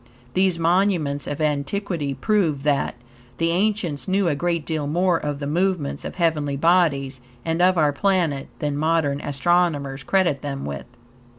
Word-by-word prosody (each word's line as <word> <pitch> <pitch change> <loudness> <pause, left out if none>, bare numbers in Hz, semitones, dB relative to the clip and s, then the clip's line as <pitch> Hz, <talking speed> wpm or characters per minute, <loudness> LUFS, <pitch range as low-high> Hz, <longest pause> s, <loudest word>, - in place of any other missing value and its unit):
These 185 -2 +2
monuments 165 -4 +1
of 145 +1 -4
antiquity 150 0 -1
prove 160 -3 +1
that, 145 -4 +1 0.4
the 165 +1 +1
ancients 185 -5 0
knew 195 0 +2
a 160 - +2
great 170 0 -1
deal 155 -3 -2
more 175 +2 +2
of 145 -1 -3
the 140 - -5
movements 170 -1 -1
of - - -6
heavenly 155 -5 0
bodies 140 -5 +2 0.2
and 165 +1 0
of 185 0 +4
our 150 -2 +3
planet 170 -5 0
than 145 -2 -2
modern 150 -2 +1
astronomers 145 -2 0
credit 170 -1 +1
them 140 -2 -4
with. 70 -1 -5
160 Hz, 155 wpm, -23 LUFS, 140-180 Hz, 0.4 s, of